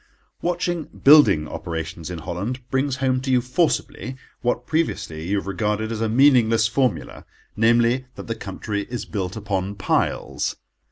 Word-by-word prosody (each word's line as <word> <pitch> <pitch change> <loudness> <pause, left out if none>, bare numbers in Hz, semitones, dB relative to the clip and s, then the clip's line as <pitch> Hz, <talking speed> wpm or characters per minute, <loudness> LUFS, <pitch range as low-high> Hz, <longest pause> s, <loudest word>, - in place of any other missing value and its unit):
Watching 175 -2 -1
building 140 - +5
operations 80 -1 -5
in 90 - -5
Holland 90 +10 -4
brings 135 0 +1
home 130 -1 0
to 135 - -4
you 130 -1 +4
forcibly, 130 - -1 0.3
what 125 0 -1
previously 85 - -2
you 100 - 0
have 100 - -3
regarded 105 +3 -1
as 110 -1 -3
a 115 - +1
meaningless 115 -3 +5
formula—namely, 120 0 0
that - - -8
the 115 - -2
country 100 0 -5
is 120 -1 -4
built 95 -4 -4
upon 100 -2 -2
piles. 95 - -1
115 Hz, 145 wpm, -23 LUFS, 100-130 Hz, 0.3 s, building